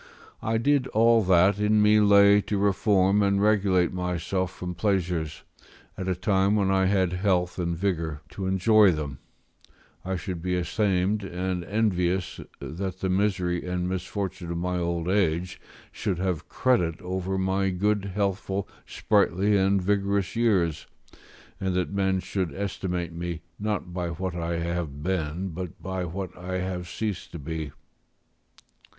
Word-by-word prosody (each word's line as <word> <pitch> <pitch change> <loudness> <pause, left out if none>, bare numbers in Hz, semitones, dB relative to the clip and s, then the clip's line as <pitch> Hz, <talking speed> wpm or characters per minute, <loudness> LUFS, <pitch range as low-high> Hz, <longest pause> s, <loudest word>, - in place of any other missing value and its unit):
I 110 +1 0
did 135 +2 +2
all 115 0 +4
that 95 +2 +4
in 105 +1 +3
me 105 0 +5
lay 100 0 +6
to 105 - +1
reform 100 0 +3
and 100 -1 +2
regulate 100 -4 +3
myself 90 +1 -2
from 90 -1 -6
pleasures, 90 -6 -1 0.5
at 95 - -5
a 95 - +1
time 95 +1 +2
when 100 -2 +2
I 95 0 +3
had 95 -2 +2
health 90 -1 0
and 85 -1 -1
vigour 80 -5 -2
to 95 -1 -5
enjoy 100 +2 +5
them; 75 -4 -5 0.8
I 95 +1 -2
should 90 0 -5
be 90 +1 -1
ashamed 95 +2 0
and 90 -1 -3
envious 95 -3 0 0.2
that 95 +3 -5
the 95 - 0
misery 95 -2 0
and 90 0 -1
misfortune 95 -1 -4
of 85 - -2
my 90 +1 -1
old 85 -1 -2
age 90 -2 0 0.3
should 95 -4 -2
have 90 -4 -2
credit 90 -11 +1
over 95 +1 -2
my 95 +1 +1
good 100 +2 0
healthful, 100 -1 -1 0.2
sprightly, 100 -1 +2
and 100 0 +3
vigorous 100 0 0
years, 95 -9 +1 0.7
and 95 -1 -1
that 90 +1 -1
men 95 -1 +1
should 95 -4 -2
estimate 90 -3 -3
me, 85 -1 -5 0.2
not 105 -4 -2
by 90 -1 -2
what 90 +2 -4
I 85 0 -2
have 85 -4 -3
been, 90 0 -2
but 90 0 -7
by 95 -1 -3
what 95 +2 -5
I 95 +1 -4
have 90 -1 -4
ceased 105 0 -4
to - - -5
be. 80 0 -5
95 Hz, 150 wpm, -26 LUFS, 90-100 Hz, 0.8 s, lay